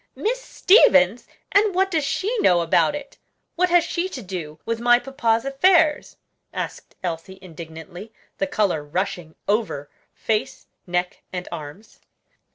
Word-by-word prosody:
"Miss - - -1
Stevens! 220 - +4 0.2
and 405 -1 +3
what 385 +1 +2
does 320 -3 +1
she 395 - -1
know 175 - +4
about 170 - +2
it? 285 -1 -9 0.4
what 365 +1 +2
has 350 -1 +5
she 360 +2 -2
to 255 -9 -7
do 170 -5 -6
with 230 0 -2
my 240 +1 +5
papa's 240 -2 0
affairs?" 305 +2 +3 0.3
asked - - -6
Elsie 175 +2 -5
indignantly, 170 +3 -10 0.3
the 290 - 0
color 200 - 0
rushing 175 +1 -3
over 200 -10 -1 0.2
face, 215 -1 -2 0.2
neck, 180 +1 -2
and 180 -1 -5
arms. 155 +8 -9
220 Hz, 140 wpm, -23 LUFS, -, 0.4 s, has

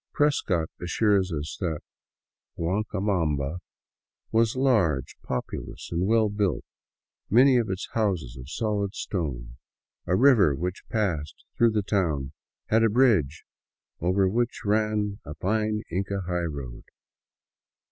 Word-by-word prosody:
Prescott 95 - +1
assures 95 +1 +2
us 75 -1 -4
that 80 -5 -2 0.4
" - - -54
Guancabamba 90 -5 -1 0.7
was 115 +1 +2
large, 105 - +2
populous 65 -1 -5
and 85 +3 0
well 110 0 +4
built, 100 -5 -1 0.6
many 130 +4 +6
of 115 -4 0
its 95 0 -3
houses 95 - -1
of 65 0 -10
solid 105 +1 -1
stone. 60 -10 -4 0.5
A 90 - +2
river 105 - +5
which 90 +6 -5
passed 80 - -2
through 115 - +4
the 105 -2 +1
town 80 -10 0 0.4
had 110 +1 +4
a 115 - +4
bridge 105 - +2 0.5
over 95 +3 +2
which 115 +4 -1
ran 105 -1 0
a 75 - -8
fine 105 +2 0
Inca 100 +2 -2
highroad.' 80 -9 -4
95 Hz, 120 wpm, -26 LUFS, 80-110 Hz, 0.7 s, many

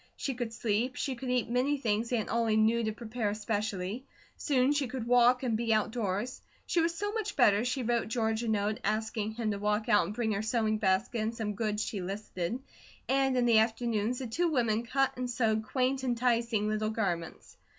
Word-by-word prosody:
She 275 - -2
could 240 -2 -4
sleep, 230 +3 -1
she 275 - -2
could 255 +1 -6
eat 250 -2 +1
many 255 +5 +1
things 230 -2 -1
Aunt 230 -4 0
Ollie 230 -2 +2
knew 225 +2 +3
to 220 - 0
prepare 220 0 -3
especially; 210 +1 -3 0.3
soon 265 -2 +2
she 290 -2 +1
could 245 0 -5
walk 245 +1 +4
and 235 -3 +1
be 230 0 0
outdoors. 215 +1 -1 0.2
She 340 - +1
was 335 +1 0
so 410 +4 -2
much 425 -2 -3
better 215 -4 +4
she 255 +1 -1
wrote 235 0 0
George 220 -1 0
a 235 - -3
note, 210 0 0
asking 215 0 -1
him 220 -1 -2
to 200 - -3
walk 210 +1 0
out 205 - +4
and 210 - -6
bring 230 -2 0
her 200 -1 -1
sewing 220 -1 0
basket, 205 +4 +1
and 220 +2 -2
some 215 -2 -3
goods 210 0 -1
she 200 - -4
listed, 195 +2 -4 0.5
and 270 -1 +2
in 245 - +3
the 230 -2 +6
afternoons 225 0 0
the 260 - -4
two 340 +10 0
women 235 -5 +1
cut 270 +2 +1
and 250 0 -3
sewed 225 -3 +1
quaint, 260 +2 0
enticing 235 -3 +1
little 215 0 0
garments. 180 -7 -3
230 Hz, 200 wpm, -30 LUFS, 215-250 Hz, 0.5 s, the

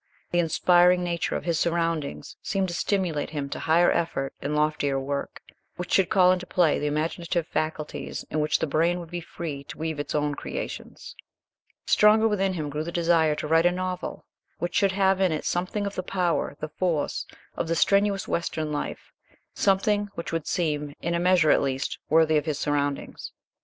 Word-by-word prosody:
The 175 - +2
inspiring 180 +2 +4
nature 170 -1 -1
of - - -3
his 170 -2 0
surroundings 165 -3 -1
seemed 195 -2 -1
to - - -4
stimulate 175 -5 -1
him 145 -2 -4
to - - -5
higher 165 +2 +4
effort 135 -5 -1
and 150 +1 -2
loftier 150 -2 +1
work, 140 +1 -4 0.3
which 180 0 -5
should 190 -2 +4
call 185 -1 +5
into 180 -1 -1
play 170 -5 +2
the 150 - -1
imaginative 165 +3 -1
faculties 155 -2 -3
and 155 - 0
in - - +2
which 150 0 +2
the - - -1
brain 165 +4 +1
would 170 -1 -9
be 175 0 -4
free 155 -4 -6
to - - -9
weave 160 -1 -3
its 145 - -3
own 150 -1 +1
creations. - - -7 0.7
Stronger 215 +1 +5
within 195 -3 +1
him 155 -4 -4
grew 150 +2 -2
the 170 - -5
desire 165 -3 +3
to 150 - -4
write 165 +2 +4
a - - +3
novel 185 0 -4 0.3
which 175 0 -3
should 195 -2 +2
have 190 0 +2
in 185 -3 +3
it 155 - -3
something 185 +4 -1
of 200 - -3
the 185 - -2
power, 180 -5 -1
the 155 - -4
force, 160 -2 -1 0.3
of - - -2
the 165 - 0
strenuous 200 +2 +2
western 155 -2 -2
life, 145 - -5 0.4
something 205 +1 +2
which 170 - -5
would 165 -2 -2
seem, 150 -5 -1
in 170 - 0
a 170 - +1
measure 175 -3 +4
at - - +4
least, 135 -1 -2
worthy 160 0 +4
of 150 - 0
his 150 -3 -1
surroundings. 145 -1 -2
170 Hz, 195 wpm, -26 LUFS, 150-180 Hz, 0.7 s, call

